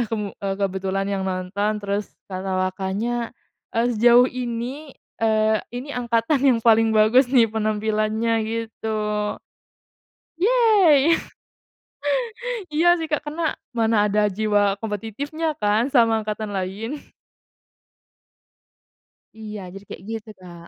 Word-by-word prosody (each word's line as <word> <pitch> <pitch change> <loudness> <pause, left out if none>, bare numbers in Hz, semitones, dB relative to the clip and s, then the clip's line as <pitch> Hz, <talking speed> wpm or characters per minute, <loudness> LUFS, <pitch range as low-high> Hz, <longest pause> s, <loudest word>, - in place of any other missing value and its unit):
mmm, 210 -3 -3 0.2
kebetulan 195 0 -1
yang 195 -1 -1
nonton. 195 +3 -1
Terus 200 +1 -2 0.2
kata 190 0 -3
Wakanya, 205 +6 -2 0.4
eee, 230 +1 +2
"Sejauh 240 +3 +6
ini, 250 +4 -5 0.2
eee, 220 -1 +2 0.2
ini 255 +4 -5
angkatan 235 +3 +1
yang 250 -3 +4
paling 225 -1 +5
bagus 220 +5 +5
nih 235 -5 +4
penampilannya," 215 +1 0
gitu. 225 -1 -4 1.4
Yey! 380 - +5 1.6
Iya 320 +3 +2
sih, 325 - -3
Kak, 300 - +2
karena 315 +3 -3 0.3
mana 225 -1 +2
ada 210 0 +2
jiwa 205 -1 +1
kompetitifnya 225 - -4
kan 210 +5 +2
sama 230 -4 +4
angkatan 215 0 -4
lain. 195 +4 -3 2.5
Iya, 215 -1 -7
jadi 195 - -10
kayak - - -9
gitu, 225 0 -6
Kak. 170 -2 -12
220 Hz, 105 wpm, -23 LUFS, 205-240 Hz, 2.5 s, Sejauh